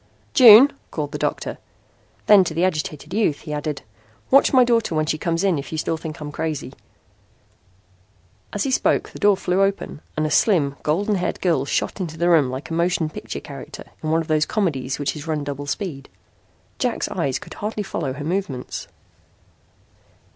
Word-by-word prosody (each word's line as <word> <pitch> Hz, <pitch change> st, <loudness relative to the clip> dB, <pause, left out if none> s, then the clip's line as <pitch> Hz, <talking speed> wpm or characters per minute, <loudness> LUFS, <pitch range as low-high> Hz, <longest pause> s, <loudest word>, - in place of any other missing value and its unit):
"June," 250 Hz, 0 st, +9 dB, 0.2 s
called -, -, -4 dB
the -, -, -5 dB
doctor. -, -, -2 dB, 0.7 s
Then 205 Hz, -2 st, +7 dB
to 160 Hz, -, -4 dB
the 170 Hz, +3 st, +2 dB
agitated 155 Hz, -2 st, -3 dB
youth 200 Hz, -9 st, +1 dB
he 150 Hz, -, -6 dB
added: 150 Hz, -1 st, -4 dB, 0.5 s
"Watch 275 Hz, +1 st, +6 dB
my 255 Hz, -2 st, +6 dB
daughter 230 Hz, -8 st, +1 dB
when 155 Hz, 0 st, +1 dB
she 155 Hz, 0 st, -1 dB
comes 170 Hz, +2 st, -1 dB
in 185 Hz, -6 st, +2 dB
if 140 Hz, -, -8 dB
you 160 Hz, -, -3 dB
still 160 Hz, -, -1 dB
think 160 Hz, -1 st, -7 dB
I'm 150 Hz, -1 st, -6 dB
crazy." 155 Hz, -1 st, -4 dB, 1.8 s
As 205 Hz, -, -1 dB
he 270 Hz, -, -1 dB
spoke -, -, +1 dB
the -, -, -10 dB
door 205 Hz, -1 st, +4 dB
flew 180 Hz, +1 st, 0 dB
open 195 Hz, -6 st, -1 dB, 0.2 s
and 155 Hz, -, +1 dB
a 155 Hz, -, -2 dB
slim, 150 Hz, -10 st, +3 dB
golden 195 Hz, +8 st, 0 dB
haired 180 Hz, -, -2 dB
girl 165 Hz, -7 st, +1 dB
shot 140 Hz, -, -2 dB
into 160 Hz, -3 st, -5 dB
the 170 Hz, +2 st, +1 dB
room 155 Hz, -6 st, +4 dB
like 130 Hz, +5 st, -6 dB
a -, -, -2 dB
motion 170 Hz, -1 st, 0 dB
picture -, -, -6 dB
character -, -, -9 dB, 0.2 s
in 155 Hz, -, -3 dB
one 165 Hz, +1 st, +2 dB
of 160 Hz, -, -7 dB
those 155 Hz, -1 st, +2 dB
comedies 140 Hz, -11 st, -1 dB
which 145 Hz, +1 st, -2 dB
is 150 Hz, +1 st, -8 dB
run 155 Hz, -2 st, -1 dB
double 145 Hz, 0 st, -5 dB
speed. 140 Hz, -1 st, -4 dB, 0.7 s
Jack's -, -, -1 dB
eyes 135 Hz, -2 st, -1 dB
could -, -, -11 dB
hardly 210 Hz, 0 st, -4 dB
follow 155 Hz, -8 st, -3 dB
her 145 Hz, +2 st, -6 dB
movements. 160 Hz, -8 st, -3 dB
160 Hz, 185 wpm, -22 LUFS, 150-195 Hz, 1.8 s, June